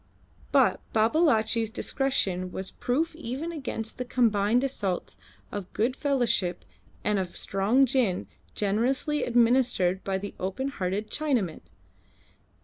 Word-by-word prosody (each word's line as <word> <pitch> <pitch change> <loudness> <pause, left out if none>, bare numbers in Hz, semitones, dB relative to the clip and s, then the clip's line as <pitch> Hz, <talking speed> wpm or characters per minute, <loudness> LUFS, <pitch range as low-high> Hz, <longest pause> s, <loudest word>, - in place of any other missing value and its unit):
But - - +4
Babalatchi's 225 -2 +3
discretion 200 -7 -1
was 190 +1 -4
proof 310 +7 -1
even 295 +2 -4
against 255 -8 -5
the - - 0
combined 230 -1 +2
assaults 200 -9 -2 0.4
of 200 -3 -6
good 240 +4 +1
fellowship 245 -11 0 0.4
and 210 -1 +1
of 185 -2 -4
strong 210 +8 +3
gin 240 -8 +1 0.3
generously 255 +8 0
administered 235 -6 +3
by 195 -1 -1
the 200 +1 -6
open 225 +9 -2
hearted 200 -2 -3
Chinaman. 250 - 0
230 Hz, 115 wpm, -27 LUFS, 195-265 Hz, 0.4 s, But